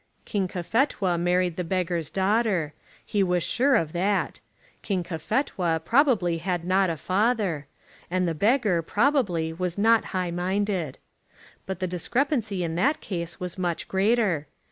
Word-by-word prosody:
King 200 -4 -1
Cophetua 185 - 0
married 180 0 +1
the 180 - -1
beggar's 175 -3 -1
daughter. 190 -5 +1 0.3
He 205 - 0
was 180 -2 +1
sure 270 +2 +2
of 160 -2 0
that. 190 +3 0 0.4
King 190 -4 -1
Cophetua 175 - -1
probably 225 - +3
had 175 0 -2
not 190 +1 +3
a 165 - -2
father; 190 - 0 0.4
and 180 0 +1
the 165 - 0
beggar, 205 - +2
probably, 200 - +1
was 180 +1 -3
not 225 +2 +4
high 185 -2 -2
minded. 185 -3 -1 0.7
But 190 -1 -4
the - - +1
discrepancy 215 - -1
in 165 -1 -2
that 270 - +1
case 170 -3 -5
was 180 0 -5
much 175 -2 -2
greater. 195 -6 +1
185 Hz, 145 wpm, -26 LUFS, 170-210 Hz, 0.7 s, not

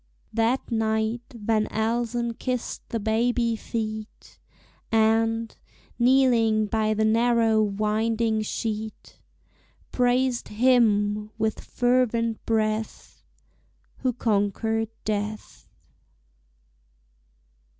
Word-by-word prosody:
That 230 +4 0
night 220 +1 0
Van 220 -2 0
Elsen 235 +1 -1
kissed 250 +1 -4
the 230 - -2
baby 230 +2 +1
feet, 220 -1 -6 0.5
And, 225 +1 +2 0.4
kneeling 240 -4 +4
by 215 0 0
the 220 +1 +1
narrow 225 0 +3
winding 215 +2 0
sheet, 215 0 -5 0.7
Praised 250 0 +1
Him 210 -3 +2
with 220 0 -1
fervent 240 -2 0
breath 220 -1 -2 0.8
Who 255 - 0
conquered 220 0 0 0.2
death. 210 - -4
225 Hz, 80 wpm, -25 LUFS, 215-235 Hz, 0.8 s, kneeling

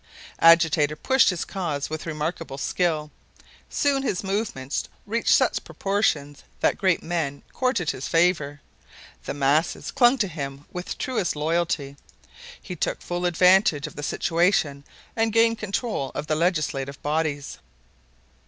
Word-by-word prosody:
Agitator 160 -3 +5
pushed 265 - +3
his 180 -3 -2
cause 160 -7 -3
with 155 +1 -6
remarkable 155 -2 -4
skill. 155 0 -1 0.6
Soon 280 -1 +1
his 205 -9 -2
movements 195 - -2 0.2
reached 230 +3 -1
such - - +2
proportions 150 -8 -1 0.2
that - - +1
great 185 -3 +2
men 160 -5 -2
courted 250 - 0
his 130 - -6
favor. 165 -4 +1 0.7
The - - -4
masses 145 +4 +1
clung 245 +2 +4
to 215 -5 +1
him 140 -4 -6
with 180 0 -5
truest 235 -11 -1
loyalty. 150 -2 -1 0.6
He 180 - -7
took - - -2
full 175 0 -2
advantage 180 -3 +4
of 150 - -8
the 145 - -6
situation 160 -3 +1 0.3
and 225 0 +1
gained 230 0 +3
control 205 - -2
of 145 - -3
the 155 - -1
legislative 150 -5 -1
bodies. 150 -1 -2
165 Hz, 135 wpm, -24 LUFS, 145-190 Hz, 0.7 s, Agitator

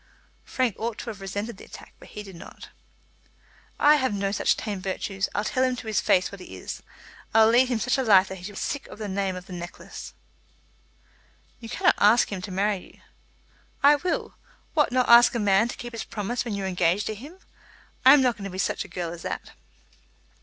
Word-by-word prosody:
Frank 255 -5 -1
ought 225 0 -3
to 235 - -5
have 200 -3 -12
resented 205 +3 -5
the - - -12
attack, - - -13
but - - -14
he 210 - -8
did 195 -3 -11
not. 170 - -12 1.1
"I 300 +1 +6
have 260 -7 0
no 195 0 -1
such - - +1
tame 205 -4 -4
virtues. 195 +1 -3
I'll 205 - 0
tell 255 +4 0
him 255 -1 +1
to 245 - -9
his 220 -1 0
face 185 -1 +2
what 200 -2 -10
he - - -10
is. - - -7 0.5
I'll 220 0 +7
lead 245 +3 +5
him 245 - +1
such 250 +4 0
a - - +1
life 195 -5 +6
that 190 0 -7
he - - -14
shall 205 - -7
be - - -10
sick 285 - -3
of - - -11
the 220 - -6
very 195 - -4
name 195 -1 -1
of 180 0 -9
necklace." 175 -1 -9 1.4
"You 230 -2 -9
cannot - - +3
ask 215 +3 +5
him 190 -2 -4
to 190 - -7
marry 200 +2 +1 0.2
you." - - -26 0.8
"I 290 +1 +7
will. 350 +4 -2 0.4
What, 300 -4 +2
not 255 0 +2
ask 235 +1 +7
a - - 0
man 205 +1 +3
to - - -7
keep 240 -1 -8
his 230 - -4
promise 230 +4 -3
when 225 -4 -3
you 200 - -4
are - - -1
engaged 180 +1 +1
to 220 - -2
him? 285 - -11 0.7
I 265 +2 +9
am 275 - +4
not 245 -2 +2
going 200 - -7
to - - -4
be 185 - -8
such 190 - -1
a - - -12
girl 175 -2 -4
as 170 - -9
that." - - -5
210 Hz, 230 wpm, -25 LUFS, 195-240 Hz, 1.4 s, I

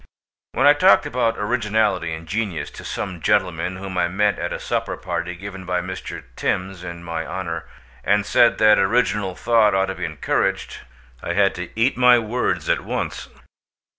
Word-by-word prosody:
When 135 - +2
I 145 - +8
talked 125 -8 +5
about 115 -2 0
originality 105 -5 0
and 80 +1 -7
genius 100 -4 -3
to - - -11
some 95 -4 -5
gentlemen 90 -3 +1
whom 95 -1 -4
I 85 - +2
met 100 +3 +1
at 85 - -3
a - - -3
supper - - -2
party 85 0 -4
given 95 +1 -8
by 90 0 -1
Mr. 90 +1 -6
Thims 95 -1 -2
in 85 -1 -7
my 85 -1 -4
honour, 85 -3 -5 0.4
and 105 -1 +2
said 120 - +4
that 105 -1 +5
original 100 -2 +1
thought 110 -4 +3
ought 95 0 +1
to - - -2
be - - -4
encouraged, - - -1 0.4
I 85 - -3
had 100 +1 +3
to 90 0 -6
eat 120 +3 +2
my 125 -1 +6
words 120 +2 -1
at - - +1
once. - - -4
95 Hz, 175 wpm, -22 LUFS, 90-110 Hz, 0.4 s, I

